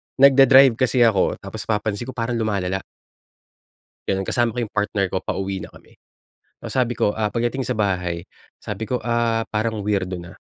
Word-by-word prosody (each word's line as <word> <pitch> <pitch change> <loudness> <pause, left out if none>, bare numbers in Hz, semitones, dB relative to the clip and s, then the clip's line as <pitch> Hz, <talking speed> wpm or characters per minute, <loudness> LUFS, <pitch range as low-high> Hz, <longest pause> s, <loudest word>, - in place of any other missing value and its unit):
nagda-drive 135 -2 +7
kasi 130 -1 +3
ako 110 -5 +3
tapos - - -8
napapansin 105 +1 -2
ko 130 - -7
parang 120 0 -2
lumalala. 95 -4 -1 1.3
Ganun, 95 0 0
kasama 120 -1 +1
ko 125 - -8
yung 115 -3 -4
partner 105 -2 0
ko, 95 - -4
pauwi 95 -1 -3
na - - -12
kami. - - -19 0.7
Tapos - - -6
sabi 125 -2 +1
ko, 105 - +1
ah, 105 -1 +1
pagdating 120 +2 -1
sa 125 - -1
bahay, 90 -5 -1 0.4
sabi 105 +1 -5
ko, 125 +1 -2
"Ah, 115 -1 +1
parang 110 0 -1
weirdo 95 -3 -1
na, 85 - -13
110 Hz, 170 wpm, -22 LUFS, 100-120 Hz, 1.3 s, nagda-drive